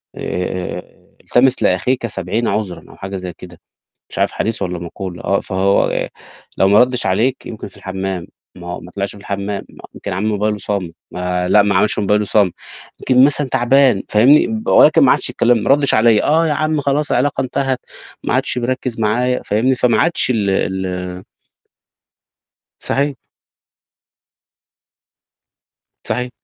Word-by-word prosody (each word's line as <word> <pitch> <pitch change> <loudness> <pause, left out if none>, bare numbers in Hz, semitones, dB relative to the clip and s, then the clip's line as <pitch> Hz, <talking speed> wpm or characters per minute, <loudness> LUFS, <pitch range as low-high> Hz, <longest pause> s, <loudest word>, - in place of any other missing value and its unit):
آآ - - -9
آآ 90 0 -3
آآ - - -15
التمس 130 +1 +2
لأخيك 125 -2 +1
70 100 +4 -2
عُذرًا 100 -5 -3
أو - - -14
حاجة 95 0 -6
زي 90 -1 -6
كده - - -12 0.5
مش - - -7
عارف - - +1
حديث 110 -2 -2
والّا 90 -2 -3
مَقولة 90 +1 -7
آه، 100 - +1
فهو 95 +1 +1
ي - - -2 0.5
لو 95 - +4
ما 100 +1 +5
ردّش 125 -3 +1
عليك 115 +8 0
يمكن 110 - -7
في - - -20
الحمام 95 -2 -4 0.3
ما 90 0 -7
ما 90 - -12
طلعش 100 +1 -3
في - - -13
الحمام 100 0 -4
ما - - -16
يمكن - - -6
عامل 100 +4 -2
موبايله 105 0 -1
صامت 95 -5 -4 0.2
ما 90 0 -2
لأ، 105 - +5
ما 100 -1 0
عملش 100 +3 +2
موبايله 105 +1 +1
صامت، 100 -3 +2 0.5
يمكن 130 0 +4
مثلًا 145 -1 +2
تعبان 130 -3 +3
فاهمني، 125 +8 +5
ب 220 0 -4
ولكن 155 +1 +6
ما 130 - +6
عادش - - -2
كلّمني، 120 -1 +4
ما - - -1
ردّش 140 0 +3
عليّا 110 -1 +4
آه، 160 +2 +3
يا 155 - +1
عم 155 +1 0
خلاص 145 +2 0
العلاقة 135 +3 +1
انتهت 130 0 -1 0.5
ما - - 0
عادش - - 0
بيركّز 125 -1 -3
معايا 125 +4 0
فاهمني 120 +6 +1
فما 125 -2 +2
عادش 165 -5 +4
ال 105 -5 +1
ال 90 -1 -3 1.6
صحي 140 0 -1 2.9
صحي 125 0 -2
105 Hz, 160 wpm, -17 LUFS, 95-130 Hz, 2.9 s, ولكن